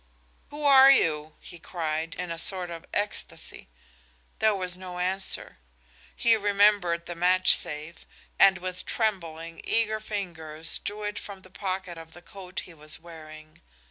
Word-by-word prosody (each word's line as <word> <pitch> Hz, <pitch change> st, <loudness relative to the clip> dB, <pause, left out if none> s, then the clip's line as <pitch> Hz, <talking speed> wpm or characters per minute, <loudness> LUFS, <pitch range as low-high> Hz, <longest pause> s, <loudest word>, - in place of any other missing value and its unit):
"Who 295 Hz, +1 st, -7 dB
are 270 Hz, -1 st, +9 dB
you?" 155 Hz, -, +3 dB
he 175 Hz, -, -12 dB
cried, 160 Hz, -1 st, -3 dB
in 180 Hz, -1 st, -4 dB
a 165 Hz, -, -4 dB
sort 180 Hz, 0 st, -1 dB
of 165 Hz, +1 st, -8 dB
ecstacy. 205 Hz, 0 st, -4 dB, 0.7 s
There 220 Hz, -1 st, +4 dB
was 185 Hz, -2 st, -3 dB
no 180 Hz, -1 st, -8 dB
answer. 185 Hz, -, -1 dB, 0.6 s
He 230 Hz, -1 st, +4 dB
remembered 200 Hz, -5 st, +3 dB
his 175 Hz, -, -5 dB
matchsafe, 170 Hz, -3 st, +2 dB, 0.3 s
and 195 Hz, -1 st, +7 dB
with 185 Hz, 0 st, -6 dB
trembling, 165 Hz, -7 st, -2 dB
eager 220 Hz, -1 st, +1 dB
fingers 165 Hz, -7 st, -4 dB
drew 210 Hz, +1 st, -5 dB
it 210 Hz, 0 st, -3 dB
from 195 Hz, -2 st, -8 dB
the 185 Hz, -, -16 dB
pocket 185 Hz, -3 st, -4 dB
of 160 Hz, 0 st, -12 dB
the 175 Hz, -, -13 dB
coat 185 Hz, -1 st, -7 dB
he 180 Hz, -, -12 dB
was 155 Hz, -1 st, -7 dB
wearing. 155 Hz, -2 st, -12 dB
180 Hz, 145 wpm, -27 LUFS, 165-200 Hz, 0.7 s, are